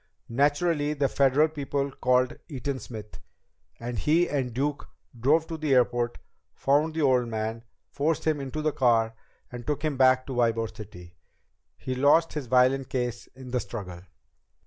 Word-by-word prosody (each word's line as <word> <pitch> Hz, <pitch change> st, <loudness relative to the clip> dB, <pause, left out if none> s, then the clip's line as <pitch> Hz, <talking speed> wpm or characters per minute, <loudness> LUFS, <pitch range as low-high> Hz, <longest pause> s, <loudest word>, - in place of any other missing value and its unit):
Naturally, 145 Hz, +4 st, +1 dB
the 140 Hz, -1 st, +1 dB
Federal 140 Hz, +3 st, +3 dB
people 140 Hz, -2 st, -3 dB
called 125 Hz, -1 st, +1 dB
Eaton 135 Hz, -1 st, -3 dB
Smith, 110 Hz, -4 st, -9 dB, 0.6 s
and 120 Hz, -1 st, -4 dB
he 160 Hz, -, +3 dB
and 135 Hz, -4 st, -2 dB
Duke 145 Hz, +4 st, -2 dB, 0.3 s
drove 155 Hz, +7 st, +3 dB
to 165 Hz, -1 st, -6 dB
the 150 Hz, -3 st, +1 dB
airport, 120 Hz, -1 st, +1 dB, 0.4 s
found 150 Hz, +3 st, +1 dB
the 160 Hz, -, 0 dB
old 125 Hz, -3 st, +3 dB
man, 110 Hz, 0 st, -3 dB, 0.3 s
forced 155 Hz, +2 st, -1 dB
him 155 Hz, -3 st, +1 dB
into 145 Hz, +3 st, -4 dB
the 155 Hz, -, +2 dB
car 115 Hz, -3 st, +2 dB, 0.4 s
and 120 Hz, -1 st, -8 dB
took 150 Hz, 0 st, -2 dB
him 150 Hz, -3 st, -1 dB
back 130 Hz, 0 st, +4 dB
to 135 Hz, -, -5 dB
Ybor 115 Hz, -2 st, 0 dB
City. 90 Hz, -5 st, -11 dB, 0.6 s
He 130 Hz, -, -4 dB
lost 145 Hz, +6 st, +3 dB
his 150 Hz, -5 st, -4 dB
violin 130 Hz, +2 st, +3 dB
case 125 Hz, -2 st, -3 dB
in 130 Hz, -1 st, -10 dB
the 125 Hz, -, +1 dB
struggle." 90 Hz, -8 st, -7 dB
130 Hz, 160 wpm, -27 LUFS, 120-145 Hz, 0.6 s, back